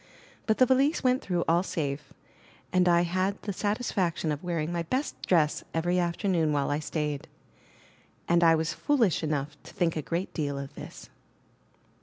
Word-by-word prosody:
But 220 - +2
the 255 - +6
valise 270 +5 +2
went 255 0 +3
through 175 -2 -1
all 170 +2 +4
safe, 145 -5 -3 0.6
and 180 -1 +4
I 170 0 +5
had 185 +3 -1
the 205 - -3
satisfaction 195 -6 -1
of 150 +2 -4
wearing 170 -2 -2
my 170 -1 -1
best 255 - -2
dress 155 -4 +2
every 175 +2 +1
after 175 +3 -1
noon 165 -5 +2
while 145 -1 0
I 145 - 0
stayed; 150 -2 -3 1.0
and 170 0 +4
I 165 -1 +6
was 160 +1 -1
foolish 240 - +2
enough 150 -2 -2
to - - -13
think 170 -2 +1
a 155 - -1
great 170 +5 -3
deal 145 -3 -2
of 140 0 -6
this. - - -10
170 Hz, 175 wpm, -28 LUFS, 155-190 Hz, 1.0 s, the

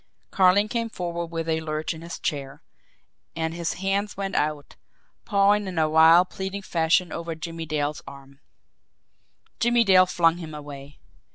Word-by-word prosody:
Carling 195 +2 +4
came 230 +1 -2
forward 170 -4 -4
with 165 0 -5
a 160 0 0
lurch 155 0 -3
in 160 - -11
his 170 +1 -7
chair 140 -3 -5 0.7
and 160 0 -2
his 170 -1 -3
hands 195 +2 -2
went 195 0 -3
out, 150 -1 -2 0.5
pawing 205 0 +2
in 180 -2 -6
a 160 -1 +3
wild, 160 +3 +5
pleading 195 0 -5
fashion 170 +1 +1
over 165 -1 -5
Jimmie 165 0 -7
Dale's 150 -1 -2
arm. 140 0 -13 1.2
Jimmie 240 0 +3
Dale 185 -3 +5
flung 165 -1 +2
him 160 -3 -8
away. 145 -1 -10
165 Hz, 155 wpm, -24 LUFS, 155-190 Hz, 1.2 s, wild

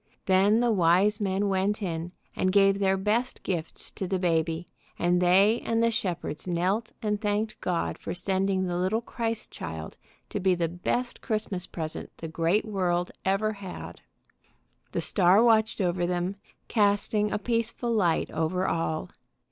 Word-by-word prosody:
Then 200 +4 +4
the 240 -1 +3
wise 195 +3 +3
men 195 0 0
went 200 +2 0
in 170 -1 -3 0.2
and 185 - +1
gave 195 0 +4
their 195 -1 +2
best 215 +6 -1
gifts 170 -4 -4
to 190 - -4
the 190 - 0
baby, 165 -1 0 0.3
and 175 +1 +2
they 195 +6 +4
and 230 0 +1
the 230 - +3
shepherds 175 -6 -3
knelt 185 +6 0
and 210 -1 0
thanked 210 0 -1
God 175 -2 -1
for 165 - -5
sending 190 +1 0
the 175 -1 -2
little 190 +6 +1
Christ 230 -2 -3
Child 80 -1 -7 0.3
to - - -3
be 185 -1 +3
the 170 -1 0
best 180 +9 -2
Christmas 215 -5 -2
present 160 -2 -5
the 165 - -6
great 165 +6 +1
world 180 -4 0
ever 200 +3 +1
had. 200 -3 -8 0.9
The - - -1
star 190 +3 +4
watched 220 -2 +3
over 175 -2 +1
them, 180 +2 -1 0.3
casting 210 0 +2
a - - +1
peaceful 230 +2 -1
light 180 -7 +1
over 165 +4 0
all. 160 - -2
190 Hz, 155 wpm, -27 LUFS, 175-210 Hz, 0.9 s, Then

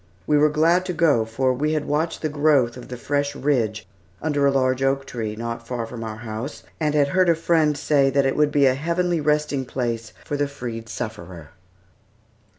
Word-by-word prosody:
We 150 - +2
were 150 +1 +5
glad 165 +4 +3
to 180 - -2
go, 145 -10 +3
for 130 +3 0
we 150 +5 0
had 150 -1 -1
watched 155 +4 -1
the - - +2
growth 145 -5 +2
of 125 - -10
the 125 - -7
fresh 145 +2 -1
ridge 115 -8 0 0.3
under 145 -2 +1
a - - +4
large 130 -1 +1
oak 135 0 +1
tree, 110 -5 -4
not 115 +1 -5
far 120 -2 -3
from 115 0 -7
our 110 -1 -5
house, 115 +4 -6 0.2
and 150 -2 0
had 145 -1 +3
heard 185 +2 +3
a 170 - +5
friend 160 -2 +2
say 140 -1 +3
that 140 0 +2
it 135 - +1
would 150 -1 +2
be 145 -1 +4
"a 130 - +5
heavenly 170 +4 0
resting 150 -2 +1
place 120 -3 -3
for 145 - -2
the 145 0 0
freed 120 -5 -7
sufferer." 85 -7 -7
140 Hz, 205 wpm, -23 LUFS, 120-150 Hz, 0.3 s, were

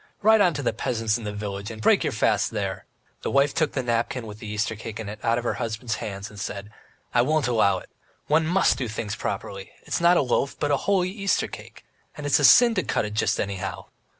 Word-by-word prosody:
Ride 220 0 +6
on 175 -5 +3
to 145 - -3
the 120 - 0
peasants 115 -1 -1
in 115 - -8
the 105 - -3
village, 105 -1 -5
and 110 -1 -8
break 110 - +4
your - - 0
fast - - +1
there!" - - -4 0.4
The - - -2
wife 140 +1 +3
took 155 -3 0
the 130 - -1
napkin 120 0 -1
with 105 -1 -9
the 110 - -8
Easter 105 +2 -2
cake 110 0 -7
in 110 - -5
it 105 +1 -8
out 115 +1 +2
of 120 - -2
her - - 0
husband's 115 -1 -3
hands 100 -3 -5
and 105 - -11
said: 100 +2 -5 0.4
"I 120 - +5
won't 150 +2 +1
allow 105 -5 +3
it! - - -11 0.4
One 155 +1 +2
must 185 +4 +3
do 125 - -2
things 105 -1 -4
properly; 100 -1 -5
it's - - -2
not 175 +1 +5
a - - +3
loaf, 135 +2 0
but 145 - 0
a 140 - +3
holy 185 -2 +2
Easter 195 -1 0
cake. - - -12 0.3
And 150 - -6
it's 145 - +3
a - - 0
sin 235 - +7
to - - +1
cut - - 0
it 105 - -5
just 110 -1 +1
anyhow." 100 -1 -4
115 Hz, 245 wpm, -25 LUFS, 105-145 Hz, 0.4 s, sin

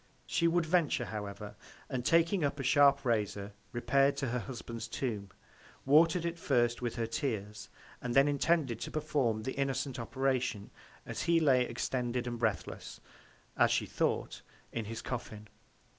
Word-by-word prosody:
She 170 - +1
would 170 0 +2
venture, 160 -7 +2
however, 105 0 -6 0.3
and 125 -2 -3
taking 165 +5 +3
up 140 0 -1
a - - -2
sharp 140 +1 +5
Razor, 105 -3 -1 0.2
repair'd 135 +4 +2
to 135 - -1
her 125 +1 -1
Husband's 115 0 -6
Tomb; 110 -5 -3 0.6
water'd 165 +4 +5
it 170 0 -3
first 120 -5 +1
with 120 -2 -2
her 115 -1 -1
Tears, 110 -3 -3 0.3
and 125 -1 -3
then 135 +1 +6
intended 145 -4 +1
to - - -4
perform 140 -8 0
the 130 - -3
innocent 135 -1 -2
Operation, 125 -3 -1 0.3
as - - -4
he 170 -1 +3
lay 130 -5 +4
extended 120 0 -2 0.2
breathless, 110 -4 -2 0.6
as - - +4
she - - +1
thought, - - -1 0.3
in 115 -2 -3
his 115 +1 -6
Coffin. 110 -4 -6
125 Hz, 150 wpm, -32 LUFS, 115-145 Hz, 0.6 s, then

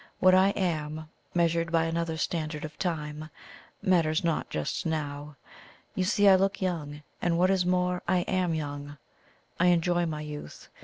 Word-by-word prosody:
What 185 0 +5
I 190 +1 +6
am, 155 -4 -2 0.3
measured 170 -1 +1
by 165 -1 +3
another 165 0 -2
standard 155 -2 -2
of 155 0 -10
time, 155 -3 -3 0.5
matters 170 -5 +2
not 165 -2 -1
just 75 -1 -2
now. 150 -2 -3 0.6
You 185 - 0
see 205 0 +3
I 195 - +9
look 195 +1 +2
young, 150 -6 -3 0.2
and, 170 -1 +1
what 185 +2 +4
is 185 -2 +1
more, 180 0 +1
I 180 0 +3
am 180 -2 0
young. 145 -1 -5 0.6
I 180 - +4
enjoy 175 0 +2
my 155 -1 -4
youth. 150 - -8
165 Hz, 160 wpm, -28 LUFS, 155-180 Hz, 0.6 s, I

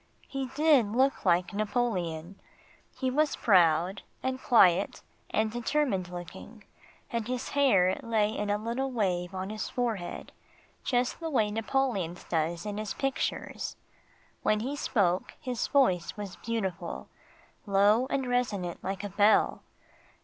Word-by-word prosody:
He 270 -1 -3
did 290 -8 +4
look 265 -1 +2
like 180 +2 +2
Napoleon. 200 -6 -2 0.6
He 260 -1 0
was 300 +2 +2
proud, 180 -1 +3 0.2
and 260 0 -2
quiet 190 -5 +4 0.3
and 220 +1 +1
determined 240 -5 0
looking, 180 +5 -9 0.5
and 230 -2 -2
his 255 +1 -3
hair 225 -9 +3
lay 220 -3 +1
in 210 0 -2
a 205 - +2
little 235 +5 -2
wave 185 -5 -1
on 190 +2 -4
his 215 - -4
forehead, 225 -8 -3 0.5
just 245 0 0
the 330 -1 -3
way 220 -8 +1
Napoleon's 220 -6 -1
does 170 +2 -1
in 210 0 -3
his 215 -2 -4
pictures. 270 -1 -2 0.7
When 215 0 +2
he 270 +5 -3
spoke, 190 -10 0
his 250 -5 -2
voice 190 -13 +2
was 200 -3 -6
beautiful 195 -6 -4 0.6
low 205 +5 +4
and 270 -2 -1
resonant 210 -8 -1
like 195 +1 -3
a 205 - -3
bell. 205 +2 +3
215 Hz, 135 wpm, -29 LUFS, 185-250 Hz, 0.7 s, did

